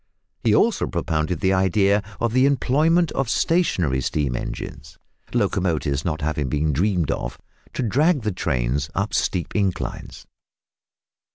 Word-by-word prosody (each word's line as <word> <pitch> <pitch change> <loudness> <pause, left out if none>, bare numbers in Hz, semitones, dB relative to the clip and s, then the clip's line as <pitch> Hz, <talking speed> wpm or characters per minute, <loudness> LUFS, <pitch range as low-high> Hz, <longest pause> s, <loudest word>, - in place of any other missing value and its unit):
He 110 -2 +4
also 230 - +2
propounded 80 0 -2
the 95 0 +3
idea 100 +2 +3 0.2
of 115 -1 0
the 130 +2 +4
employment 155 +5 +2
of 135 -4 -1
stationary 90 - +1
steam 70 -1 -1
engines 70 +3 -6 0.3
(locomotives 80 -6 0
not 80 -2 -2
having 75 -2 -1
been 75 +3 0
dreamed 90 -1 +1
of) - - -4 0.4
to - - -2
drag 145 - +2
the 105 - 0
trains 70 -5 -1
up 100 +3 -1
steep 90 -3 -1
inclines. 100 -4 -3
95 Hz, 130 wpm, -22 LUFS, 75-115 Hz, 0.4 s, He